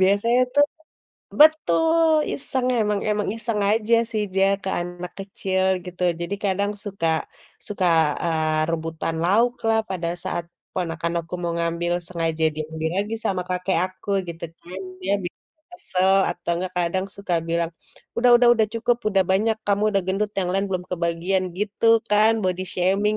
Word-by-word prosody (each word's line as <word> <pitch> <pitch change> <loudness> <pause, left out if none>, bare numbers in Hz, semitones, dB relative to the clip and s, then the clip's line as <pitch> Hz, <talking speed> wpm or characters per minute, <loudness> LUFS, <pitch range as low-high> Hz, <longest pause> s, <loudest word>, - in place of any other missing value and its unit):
Biasanya 205 +6 +3
tuh 290 0 +6 0.8
betul! 315 0 +5
Iseng. 260 -2 -2
Emang 210 -1 +1
emang 210 -1 0
iseng 230 -2 -2
aja 225 +1 +2 0.2
sih 215 -2 -1
dia 195 0 +4 0.2
ke 190 - -2
anak 175 0 -6
kecil 190 -1 -2 0.2
gitu. 180 0 -7 0.2
Jadi 175 +4 -2
kadang 200 +1 +1
suka 195 -5 -2 0.6
suka, 195 -3 -1 0.4
eee, 155 -2 +1
rebutan 165 0 -3
lauklah 225 +3 +2
pada 175 -3 -2 0.2
saat 170 - -2 0.3
ponakan 170 -2 -2
aku 170 +2 -9
mau 170 -1 -1
ngambil, 170 +1 -1
sengaja 165 -2 -1
diambil 160 +1 -3
lagi 220 - -4
sama 190 -4 0
kakek 180 -1 0
aku 185 +2 -7 0.2
gitu 170 0 -6 0.2
kan. 185 +2 -7 0.2
Dia 195 - +2
bikin 175 - -7 0.3
kesel. 190 - +1 0.2
Atau 175 0 -4
nggak 185 0 -4
kadang 180 +2 0
suka 200 -3 -2
bilang, 170 0 0 0.5
“Udah 245 +1 +4
udah 240 0 +4
udah 220 - +4
cukup, 235 +1 +1
udah 195 -2 +3
banyak, 215 +4 +2
kamu 200 +1 +2
udah 195 - +3
gendut, 200 +2 0
yang 180 - -1
lain 195 +1 0
belum 180 -1 -2
kebagian,” 175 +2 0
gitu 210 +2 -1 0.2
kan. 215 +2 +5
Body 185 -1 -1
shaming, 195 +4 +1
190 Hz, 155 wpm, -23 LUFS, 175-210 Hz, 0.8 s, tuh